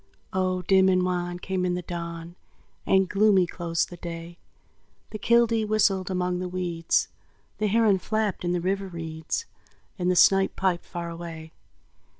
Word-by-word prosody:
Oh, 185 -1 0
dim 190 +1 +4
and 185 -1 +3
wan 175 -1 -2
came 185 +1 -3
in 180 -1 0
the 180 - -4
dawn, 170 0 -6 0.5
And 190 0 +4
gloomy 200 -1 +4
closed 170 -1 -2
the 175 - -8
day; 170 0 -8 0.7
The 215 - -6
killdee 230 0 +3
whistled 200 -3 +2
among 180 -1 -1
the 180 0 -4
weeds, 175 -2 0 0.5
The 215 - +1
heron 210 -2 +3
flapped 215 -1 -1
in 175 - 0
the 175 -1 0
river 195 +2 -1
reeds, 165 - -4 0.5
And 180 0 +1
the 185 - +2
snipe 195 +2 +5
piped 185 -3 0
far 170 -1 -5
away. 165 -1 -8
180 Hz, 155 wpm, -26 LUFS, 170-195 Hz, 0.7 s, snipe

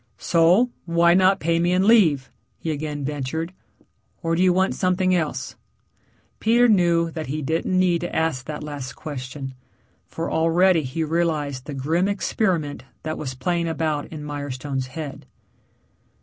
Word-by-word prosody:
"So, 175 - +3
why 170 0 +4
not 190 +1 +4
pay 165 +1 +1
me 175 +1 +2
and 185 +1 +3
leave?" 170 - +4 0.3
he 160 - -3
again 145 -1 -4
ventured. 150 +4 -3 0.7
"Or 165 0 +1
do 170 - +1
you 185 -1 +5
want 190 +2 +2
something 185 0 +1
else?" 150 -7 -2 0.8
Peter 235 +2 +4
knew 170 -5 +3
that 160 -1 -5
he 150 +3 -3
didn't 165 +5 0
need 180 -2 +3
to 175 - -4
ask 160 -5 0
that 150 -1 -5
last 140 -4 -6
question, 135 -1 -7 0.5
for 165 - -4
already 165 +2 +3
he 145 +4 -3
realized 155 -5 -1
the 145 - -5
grim 160 +8 +1
experiment 185 - -1 0.2
that 155 0 -4
was 130 -3 -4
playing 170 +6 -1
about 155 -2 -1
in 155 -2 -8
Mirestone's 140 -2 -4
head. 145 +1 -7
160 Hz, 150 wpm, -23 LUFS, 145-175 Hz, 0.8 s, you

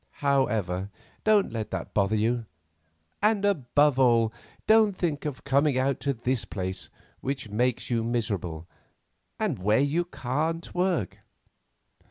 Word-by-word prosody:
However, 105 -9 +1 0.3
don't 210 - +3
let 110 -2 -3
that - - -5
bother 100 +1 +2
you, 115 +1 0 0.7
and 210 -1 +2
above 145 -6 +2
all, 115 -3 +4 0.3
don't 215 -3 +4
think 155 -4 -2
of 145 -4 -4
coming 140 0 +2
out 135 +1 +1
to 140 - 0
this 120 +1 -1
place 95 -1 -5 0.3
which 135 -4 -4
makes 125 +3 0
you 115 -1 +1
miserable, 100 -9 -2 0.7
and - - -1
where 105 +4 +3
you 150 +5 +1
can't 160 +3 -3
work. 180 - 0
130 Hz, 130 wpm, -27 LUFS, 110-150 Hz, 0.7 s, all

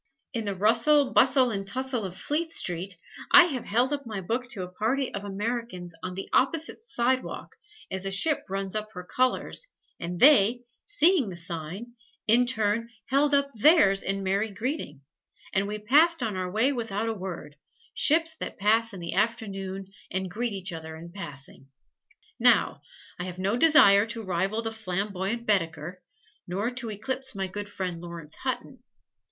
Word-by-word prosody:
In 230 -3 -2
the 200 -1 -2
rustle, 235 +8 +3
bustle 260 -1 +4
and 195 -2 -4
tussle 255 0 -2
of 185 -1 -7
Fleet 320 +3 -1
Street, 185 - -1 0.3
I - - +10
have 275 -8 -3
held 245 +6 +1
up 285 -1 -3
my 220 -5 -5
book 230 +7 -2
to 225 -7 -4
a - - -5
party 250 +8 -1
of 200 - -4
Americans 205 -3 -4
on 180 +1 -5
the 195 - -5
opposite 320 - +1
sidewalk, 260 - -2 0.4
as 190 0 -3
a 195 - -2
ship 285 +11 +1
runs 195 +1 -3
up 215 0 -3
her 180 -2 -7
colors, 255 - 0 0.3
and 175 0 -5
they, 245 -4 +6 0.2
seeing 360 - +4
the 175 - -8
sign, 170 +7 -6 0.3
in 240 +3 +4
turn 230 -1 0 0.2
held 285 +2 +3
up 280 0 +1
theirs 215 - +5
in 195 0 -2
merry 200 +3 0
greeting; 210 - -4 0.5
and 195 +1 +1
we 210 +1 -3
passed 290 +8 +4
on 220 -4 -2
our 185 -1 -3
way 220 +8 +2
without 225 -3 -3
a 225 - 0
word, 180 -7 -7 0.4
ships 325 +2 +4
that - - -5
pass 225 +3 +2
in - - -8
the 170 -1 -5
afternoon 195 -3 -2 0.2
and 190 -1 -3
greet 235 +4 -1
each 190 -2 -2
other 160 -1 -7
in 170 +2 -10
passing. 145 -7 -10 0.7
Now, - - +3 0.4
I 180 - -3
have 180 -1 -7
no 195 +4 0
desire 240 -8 +6
to 230 0 -5
rival 190 +4 -1
the 225 - -3
flamboyant 200 +2 -3
Baedeker, 170 -3 -1 0.5
nor 200 +7 -2
to 245 -2 -5
eclipse 260 +4 -2
my 195 -1 -2
good 205 +2 -6
friend 180 -4 -4
Laurence 170 -3 -8
Hutton. - - -5
210 Hz, 170 wpm, -27 LUFS, 190-250 Hz, 0.7 s, I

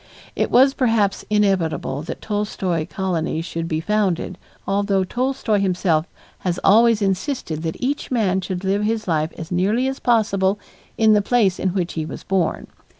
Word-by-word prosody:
It - - 0
was 270 +2 +5
perhaps 225 -7 +1
inevitable 190 -9 +1
that 155 - -7
Tolstoy 190 -6 -2
colonies 170 -4 -2
should 165 -1 -4
be 155 -1 -1
founded, 190 -1 -1 0.3
although 195 -1 +1
Tolstoy 245 0 0
himself 180 -4 +1 0.3
has 180 -1 -2
always 225 +1 +5
insisted 190 - -2
that 160 -1 -3
each 275 +3 -2
man 200 -7 +1
should 185 0 -4
live 195 +2 +1
his 220 0 -1
life 155 -2 0
as 165 +1 -8
nearly 205 +8 +1
as 270 0 -3
possible 205 -4 +2 0.4
in 220 -1 +5
the 210 - +4
place 200 -4 +2
in 190 0 -1
which 180 -3 -1
he 160 - -2
was 155 - -7
born. 185 -4 0
195 Hz, 160 wpm, -21 LUFS, 175-215 Hz, 0.4 s, was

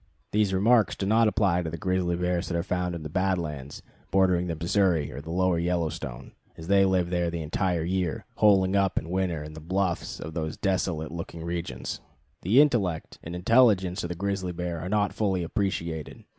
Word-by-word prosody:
These 105 -2 +2
remarks 110 +4 +3
do 95 - -3
not 110 +3 +4
apply 95 -4 +2
to 80 - -3
grizzly 90 +1 0
bears 90 0 -1
that 85 - -1
are 85 - -1
found 90 -1 -2
in 80 - -6
the - - -4
Bad 95 +4 +1
Lands 75 -4 -6 0.3
bordering 90 -2 +3
the 85 - -2
Missouri 85 -2 +1
or 70 - -7
the 80 - -11
Lower 90 0 +1
Yellowstone, 85 -7 -3 0.3
as 80 - -8
they 100 0 +5
live 90 -2 +1
there 90 -1 +1
the 85 -1 -4
entire 85 +1 0
year, 90 -1 -1
"holing 100 -2 +4
up" 100 -1 +2
in 80 - -2
winter 90 -4 -1
in 75 0 -9
the 80 - -8
bluffs 90 +2 -2
of 80 - -7
those 80 -1 -3
desolate 90 -5 -1
looking 85 0 -6
regions. 85 0 -4 0.4
The 110 +10 +5
intellect 100 - 0
and 85 +2 -6
intelligence 95 -2 +3
of 85 - -3
the 90 - -3
grizzly 100 0 -2
bear 85 -1 -3
are 90 +3 -5
not 105 -1 +1
fully 95 -4 0
appreciated. 85 -4 -3
90 Hz, 195 wpm, -27 LUFS, 85-95 Hz, 0.4 s, they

